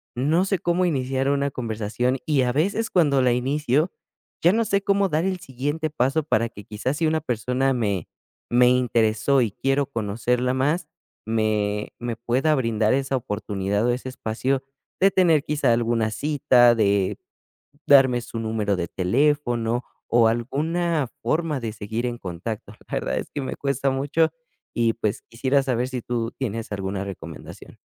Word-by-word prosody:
no 155 +9 +2
sé, 195 -1 0
cómo 175 +2 +1
iniciar 135 -3 0
una 140 0 +1
conversación. 120 +2 -2
Y, 145 -4 +2
a 125 0 0
veces, 200 +9 0
cuando 145 -7 +3
la 125 -1 +3
inicio, 145 +5 +1 0.5
ya, 175 +4 +5
no 230 +1 +2
sé, 200 -1 +1
cómo 200 -1 +2
dar 160 +3 0
el 185 -1 -1
siguiente 145 +5 -3
paso 140 +2 +1
para 115 -6 +1
que, 105 - -12
quizá, 115 +5 -2
si 160 +2 -1
una 160 0 +1
persona 125 +3 0
me 100 -8 -1 0.4
me 125 +1 +5
interesó 120 +1 +2
y 110 -4 0
quiero 135 +4 0
conocerla 120 +2 -1
más, 150 +5 0 0.4
me 105 -2 0
me 120 -1 -3
pueda 130 +7 +1
brindar 115 -3 +1
esa 135 0 0
oportunidad, 105 -1 -2
o - - +2
ese 125 +1 -3
espacio 130 +3 -2 0.4
de 195 0 +6
tener, 165 -6 +4
quizá, 145 -5 +1
alguna 115 -1 +1
cita, 125 -1 +4
de 100 -2 +1 0.7
darme 130 -3 +6
su 115 - -7
número 110 -2 -1
de 85 -1 -3
teléfono 120 +2 +1 0.2
o 115 -1 +4
alguna 150 +6 0 0.2
forma 155 -4 0
de 115 -2 -4
seguir 110 +3 -4
en 120 -1 -4
contacto. 100 +3 -6 0.2
La - - -5
verdad, - - -2
es - - -7
que 145 - -3
me 130 - -4
cuesta 140 -1 0
mucho, 145 +4 +1 0.4
y, 115 -1 +2
pues, 110 -3 -2
quisiera 130 +4 +1
saber 125 -1 -1
si 130 -2 -4
tú 115 -1 -2
tienes 115 -4 -4
alguna 100 0 -3
recomendación. 85 -6 -9
125 Hz, 165 wpm, -24 LUFS, 115-145 Hz, 0.7 s, de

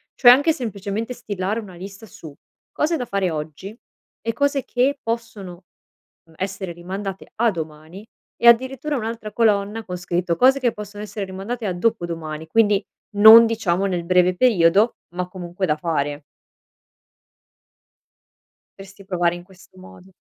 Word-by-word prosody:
Cioè, 245 - +6
anche 285 +6 +4
semplicemente 220 -1 -4
stilare 205 +1 -3
una 205 -5 -10
lista 195 +4 -10
su 160 -7 -12 0.4
cose 325 +2 0
da 250 - -4
fare 195 -5 -1
oggi 155 +7 -7 0.5
e 230 +1 -2
cose 280 +2 0
che 270 +3 0
possono, 220 -6 -6 0.6
mhmm, 165 -1 -22
essere 190 -1 -4
rimandate 190 +3 -7
a 230 0 +2
domani 160 +4 -8 0.3
e 235 - +4
addirittura 260 +5 +3
un'altra 225 -2 -5
colonna, 210 0 +1
con 180 -1 -5
scritto: 175 -1 -2
"Cose 265 +8 +4
che 245 -3 +1
possono 205 0 -9
essere 205 -1 -5
rimandate 200 +5 -6
a 190 - -1
dopodomani" 170 -6 -3
quindi 205 +1 +2 0.3
non, 220 +3 +10
diciamo, 195 -5 0
nel 180 -2 -2
breve 180 0 +3
periodo, 205 -1 +3 0.2
ma 180 0 -2
comunque 180 0 -5
da 150 -3 0
fare. 145 -3 -2 2.6
Potresti 195 0 -13
provare 175 -2 0
in 175 - -9
questo 185 0 -20
modo. 185 0 -15
195 Hz, 140 wpm, -21 LUFS, 180-230 Hz, 2.6 s, non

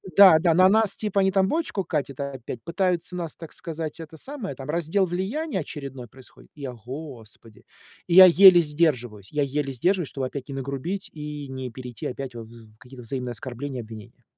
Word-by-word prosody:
"Да, 190 -5 +9
да, 170 0 +3
на 185 +3 +6
нас, 215 0 +3
типа, 210 -2 -1
они 190 0 +3
там 190 -1 +3
бочку 305 - -1
катят 145 -6 -3
опять, 130 -4 -6
пытаются 180 0 -1
нас, 170 -3 -5
так 165 -2 -10
сказать, 165 -1 -6
это 160 0 -9
самое, 265 - -6
там 135 +1 -9
раздел 170 +4 +1
влияния 195 - -2
очередной 135 -5 -7
происходит?" 130 +2 -17
И 145 - -13
я: 130 -2 -5
"Господи!" 120 -3 -10 0.4
И 175 - -1
я 190 0 +12
еле 185 0 +8
сдерживаюсь, 125 - -1
я 150 -1 +1
еле 140 0 -2
сдерживаюсь, 175 +5 0
чтобы 135 -2 -3
опять 130 0 -7
не 135 - -5
нагрубить 140 +10 -4
и 150 -2 -7
не 130 -1 -6
перейти 125 -1 -8
опять 130 -1 -6
в - - -6
в 110 -2 -16
какие-то 125 +2 -13
взаимные 125 +1 -4
оскорбления, 130 +2 -6
обвинения. 110 -2 -12
150 Hz, 190 wpm, -25 LUFS, 130-180 Hz, 0.4 s, я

